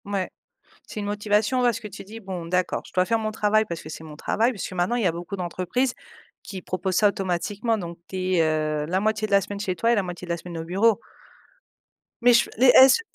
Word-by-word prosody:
Mouais. 200 -2 -2 0.6
C'est - - -6
une - - -4
motivation, 210 +4 +1
parce 240 -3 +2
que 215 - -8
tu 210 0 -10
dis: 215 +4 -10
«Bon 190 -5 -6
d'accord, 180 +2 -1
je - - -15
dois 185 0 +3
faire 230 +3 +1
mon 215 -1 -2
travail 215 0 +2
parce 170 -4 -5
que 155 - -10
c'est 160 - -8
mon 155 -2 -10
travail» 230 +10 +1
puisque 205 -6 -6
maintenant 185 +6 0
il 240 - 0
y - - +4
a - - +2
beaucoup 170 +3 -6
d'entreprises 185 +8 -1 0.5
qui 190 -2 -7
proposent 185 +1 -2
ça 210 - +5
automatiquement, 205 +3 -1
donc 170 -4 -6
tu 185 0 -1
es, 170 - +4
heu, 155 -1 0
la 185 +4 0
moitié 215 +1 0
de - - -12
la 200 0 +5
semaine 200 +1 -6
chez 190 -3 -2
toi 230 +7 +2
et - - +4
la 205 - +1
moitié 180 0 -7
de - - -14
la 170 - 0
semaine 170 0 -8
au - - -4
bureau. 200 +7 +2 1.2
Mais 245 +1 +6
je 235 - +4
les 255 +3 +5
est-ce 265 - +8
195 Hz, 245 wpm, -24 LUFS, 175-220 Hz, 1.2 s, est-ce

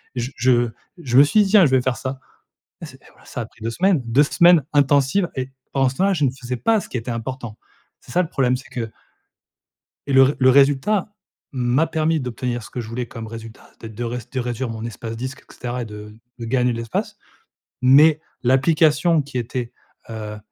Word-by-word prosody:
et - - -2
je 125 +3 -4
je 120 -2 +3 0.3
je 125 -1 +1
me - - +9
suis 210 +9 +4
dit 195 - -2
tiens, 205 -4 +7
je - - -3
vais 130 -1 +4
faire 125 -2 -1
ça 130 +1 -5 0.6
et - - -5
c'est - - -15
et - - -20
voilà - - -23
ça - - -6
a - - -7
pris 115 - -25
2 115 - -2
semaines, 180 +4 +2
2 120 +5 +4
semaines 170 0 +5
intensives 145 +6 +3
et 130 0 -3 0.2
pendant 135 -1 +2
ce 130 - -11
temps-là, 195 +4 +2
je 150 -4 0
ne 135 - +3
faisais 125 -1 -6
pas 220 - +2
ce - - -10
qui - - -5
était 115 +2 -6
important. 115 -1 -6 0.5
C'est - - -15
ça 180 - +2
le 170 - -5
problème, 130 -4 +1
c'est 130 - -12
que 115 -3 -4 1.2
et 140 - -1
le 135 0 +8
re 135 +2 +3
le 130 -1 +5
résultat, 145 - +3 0.4
m'a 130 +4 +1
permis 160 0 0
d'obtenir 125 -1 -4
ce - - -11
que - - -6
je 115 - -6
voulais 120 +2 -4
comme 115 0 -8
résultat, 115 0 -10
c'est-à-dire 110 -2 -12
de 120 - -3
réd 125 0 -4
de 130 - -2
réduire 120 0 -3
mon 115 0 -6
espace 115 0 -6
disque 130 +4 -6
et - - -14
cetera 125 0 -5
et - - -6
de 105 -1 -10 0.3
de 115 - -5
gagner 125 +1 +1
de - - -4
l'espace. 115 -1 -4 0.7
Mais, 145 +4 +6 0.2
l'application 155 +5 +3
qui 140 -2 -6
était, 120 0 -4 0.4
heu, 105 -1 -6
130 Hz, 225 wpm, -21 LUFS, 120-145 Hz, 1.2 s, me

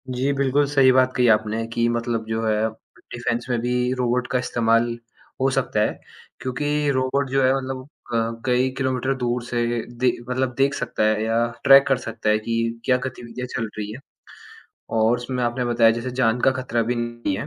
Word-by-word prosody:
जी, 130 +2 0
बिल्कुल 140 +1 +2
सही 135 -2 +5
बात 130 0 +4
कही 125 -1 +3
आपने 110 +1 +1
कि 115 0 +1
मतलब 115 -1 -1
जो 110 0 -2
है, 110 0 +1 0.4
डिफेन्स 120 0 -2
में 120 -2 +1
भी 125 +1 0
रोबोट 125 0 0
का 125 - 0
इस्तेमाल 115 -1 +2 0.5
हो 135 - +3
सकता 135 -5 0
है। 105 - 0 0.4
क्योंकि 145 +3 -1
रोबोट 130 +1 0
जो 135 +1 +2
है 130 +1 +4
मतलब 130 -1 -5 0.3
क 115 0 -1
कई 125 0 +2
किलोमीटर 130 0 0
दूर 120 -1 -2
से 120 0 -2 0.2
ए - - -1 0.2
दे 125 0 +4 0.2
मतलब 130 0 -1
देख 135 +1 +3
सकता 110 - -2
है 110 0 +2
या 115 +1 +1 0.2
ट्रैक 140 0 +8
कर 135 - +3
सकता 115 -3 -3
है 105 0 +3
कि 115 +1 -2
क्या 125 - +3
गतिविधियाँ 125 0 -6
चल 115 -2 -2
रही 105 -1 -4
हैं। 115 - -8 1.0
और 110 +2 +3
उसमें 125 +1 -4
आपने 120 +1 -1
बताया 120 -1 +4
जैसे 115 +3 -3
जान 115 0 +2
का 135 - +4
खतरा 125 -3 -1
भी 120 +2 -1
नहीं 120 -4 -3
है - - -4
125 Hz, 195 wpm, -23 LUFS, 115-130 Hz, 1.0 s, ट्रैक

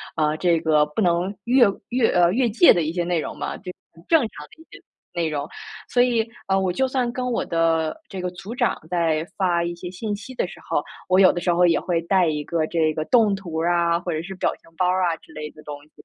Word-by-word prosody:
啊， 155 -1 +1
这 170 0 +2
个 155 -2 +3
不 150 +9 -3
能 175 +2 +1
越 245 0 +5 0.2
越 245 -2 +2
呃， 175 0 +4
越 245 +1 +2
界 240 +11 +6
的 175 - +1
一 155 - -2
些 175 0 -1
内 175 -1 0
容 - - -5
嘛， - - -4
就 - - -22
是 - - -20 0.2
很 165 +1 -18
正 325 - +5
常 230 - -2 0.2
的 320 - -19
一 - - -14
些 - - -13 0.3
内 170 -2 -1
容。 145 -1 -3 0.4
所 245 - +2
以， 235 -2 +2 0.2
啊， 195 0 +2
我 190 -1 +1
就 265 +4 +1
算 255 -2 -1
跟 250 +1 -4
我 - - -1
的 165 -1 +1
这 190 -2 -6
个 180 0 -3
组 195 +6 -8
长 - - 0
在 165 -3 0
发 175 -3 +1
一 170 0 -3
些 175 +1 -8
信 205 +3 -4
息 225 +5 -10
的 - - -1
时 - - -12
候， - - +1 0.3
我 185 - +4
有 190 -1 +7
的 175 - -3
时 175 -1 +1
候 175 +1 +4
也 165 - +3
会 170 -2 -1
带 185 0 +3
一 150 -1 -1
个 165 -2 0
这 160 -2 +1
个 155 - -2
动 220 -3 +3
图 175 -4 -6
啊， 170 0 +2
或 175 0 -4
者 155 -1 -2
是 190 - -7
表 185 - 0
情 165 - -23
包 180 - +2
儿 185 +1 +1
啊 170 -2 +1
之 - - -20
类 150 0 -6
的 155 - -15
东 150 - -6
西， 150 - -29
175 Hz, 285 characters per minute, -23 LUFS, 165-200 Hz, 0.4 s, 有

